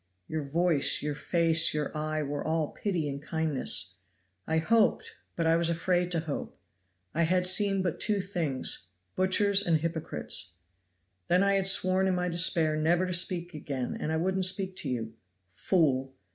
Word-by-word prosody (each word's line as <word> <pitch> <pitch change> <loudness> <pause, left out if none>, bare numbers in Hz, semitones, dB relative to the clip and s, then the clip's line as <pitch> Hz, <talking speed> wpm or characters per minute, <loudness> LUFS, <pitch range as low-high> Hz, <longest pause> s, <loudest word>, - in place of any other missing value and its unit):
Your 160 -1 -3
voice, 155 +1 +2
your 150 0 -2
face, 165 +1 +3
your 150 +1 -3
eye 155 0 -2
were 145 0 -4
all 160 -1 -1
pity 175 -7 -3
and 140 0 -5
kindness. 145 - -2 0.5
I 160 - +1
hoped, 220 +7 +1 0.2
but 165 - -1
I 165 0 +4
was 170 0 +2
afraid 175 +1 0
to 170 -2 0
hope! 155 -3 -6 0.6
I 165 - 0
had 180 +2 +2
seen 195 +1 +2
but 175 -4 -2
two 210 -2 +1
things 165 - -3 0.3
butchers 200 +2 +2
and 165 -4 +2
hypocrites. 160 - -2 0.7
Then 180 +2 +3
I 200 0 +3
had 195 -1 +1
sworn 190 0 +2
in 185 - +1
my 180 0 -1
despair 165 -2 +2
never 170 +4 +1
to 180 - -3
speak 175 0 +1
again, 140 -4 -4
and 155 - -3
I 160 - 0
wouldn't 185 +3 +1
speak 190 0 -2
to - - -3
you. 115 -3 -4 0.3
Fool! 135 - 0
165 Hz, 170 wpm, -28 LUFS, 155-185 Hz, 0.7 s, I